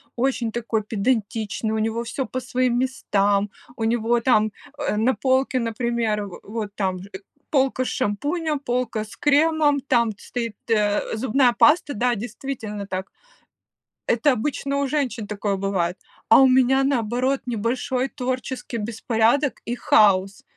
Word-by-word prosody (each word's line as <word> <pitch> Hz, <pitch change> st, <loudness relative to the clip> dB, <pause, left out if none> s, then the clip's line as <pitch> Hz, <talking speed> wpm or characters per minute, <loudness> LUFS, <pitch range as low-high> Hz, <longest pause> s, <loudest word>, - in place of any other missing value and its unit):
очень 245 Hz, -2 st, 0 dB
такой 225 Hz, -1 st, -1 dB
педантичный, 220 Hz, 0 st, -1 dB
у 220 Hz, -, -1 dB
него 225 Hz, +2 st, -1 dB
всё 260 Hz, +3 st, -3 dB
по 255 Hz, -, -4 dB
своим 250 Hz, 0 st, 0 dB
местам, 205 Hz, -5 st, +1 dB, 0.3 s
у 225 Hz, -, -3 dB
него 235 Hz, +1 st, +2 dB
там, 215 Hz, -3 st, +3 dB, 0.3 s
э, 285 Hz, -7 st, -1 dB
на 235 Hz, +5 st, +3 dB
полке, 260 Hz, 0 st, +1 dB
например, 230 Hz, -2 st, -1 dB
в 195 Hz, -, -10 dB
вот 210 Hz, -1 st, -5 dB
там 190 Hz, -2 st, -1 dB
же 195 Hz, +2 st, -11 dB, 0.4 s
полка 265 Hz, -2 st, +2 dB
с -, -, -2 dB
шампунем, 295 Hz, -, -1 dB
полка 245 Hz, -4 st, -2 dB
с 215 Hz, -, -13 dB
кремом, 295 Hz, 0 st, +3 dB
там 240 Hz, -4 st, +1 dB
стоит, 230 Hz, -2 st, -5 dB
э, 210 Hz, -1 st, +1 dB
зубная 245 Hz, +2 st, +2 dB
паста, 295 Hz, +4 st, +4 dB
да, 245 Hz, +3 st, +1 dB
действительно 220 Hz, -2 st, -5 dB
так. 190 Hz, 0 st, -5 dB, 1.0 s
Это 245 Hz, +5 st, +3 dB
обычно 280 Hz, +3 st, -2 dB
у 280 Hz, -, 0 dB
женщин 255 Hz, -7 st, -2 dB
такое 205 Hz, -1 st, -2 dB
бывает, 190 Hz, -3 st, -1 dB, 0.3 s
а 225 Hz, -, +8 dB
у 265 Hz, -, +7 dB
меня, 260 Hz, +1 st, +4 dB
наоборот, 255 Hz, 0 st, 0 dB
небольшой 250 Hz, +3 st, -1 dB
творческий 255 Hz, -1 st, -4 dB
беспорядок 230 Hz, +5 st, +1 dB
и 240 Hz, -, -2 dB
хаос. 195 Hz, -4 st, +3 dB
235 Hz, 145 wpm, -23 LUFS, 215-260 Hz, 1.0 s, а